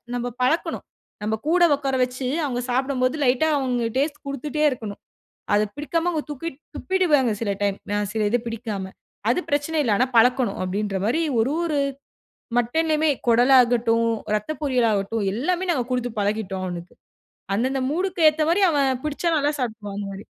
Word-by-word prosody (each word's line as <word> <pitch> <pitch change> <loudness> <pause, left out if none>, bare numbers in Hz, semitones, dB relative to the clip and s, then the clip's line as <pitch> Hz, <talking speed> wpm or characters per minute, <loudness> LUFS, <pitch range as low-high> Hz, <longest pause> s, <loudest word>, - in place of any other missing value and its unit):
நம்ம 245 0 -2 0.2
பழக்கணும். 310 +7 0 0.4
நம்ம 215 +1 0
கூட 350 +2 +4
உட்கார 275 -2 -2
வச்சு 250 +1 -3 0.2
அவங்க 245 -3 -2
சாப்டும்போது 255 +1 +1
லைட்டா 255 +5 +3
அவங்க 250 -3 -1
டேஸ்ட் 295 +2 -1
குடுத்துட்டே 290 +2 -2
இருக்கணும். 220 -6 -6 0.6
அத 210 - +3
பிடிக்காம 330 +4 -1
அவங்க 315 -4 -2
தூக்கி 295 +4 -4 0.3
துப்பிடுவாங்க 310 -10 +2
சில 210 -3 0
டைம் 200 -1 0
ந 205 0 +1
சிலது 220 +2 +1
பிடிக்காம. 210 -4 -4 0.4
அது 245 - +2
பிரச்சன 290 +2 0
இல்ல 235 - +1
ஆனா 255 - +2
பழக்கணும், 245 -2 +3
அப்டின்ற 195 +2 -2
மாரி 250 +10 +1 0.2
ஒரு 230 +5 +2
ஒரு 310 -4 0 0.8
மட்டன்லயுமே 310 +5 +2 0.2
குடலாகட்டும், 235 -1 +4 0.2
இரத்த 215 +7 -1
பொரியலாகட்டும் 225 -6 +1
எல்லாமே 360 - -1
நாங்க 265 -8 +1
குடுத்து 245 -1 -1
பழகிட்டோம் 200 -2 -2
அவனுக்கு. 175 -1 -7 0.6
அந்த 230 +5 +1
அந்த 270 -1 -1
மூடுக்கு 360 +3 -1
ஏத்த 310 +1 -2
மாரி 380 +4 +2
அவன் 280 -3 +2
பிடிச்சா 305 +3 -1
நல்லா 290 +1 +1
சாப்டுவான் 215 -4 -4
அந்த 200 -1 -4
மாரி. 195 +1 -9
250 Hz, 155 wpm, -23 LUFS, 220-295 Hz, 0.8 s, கூட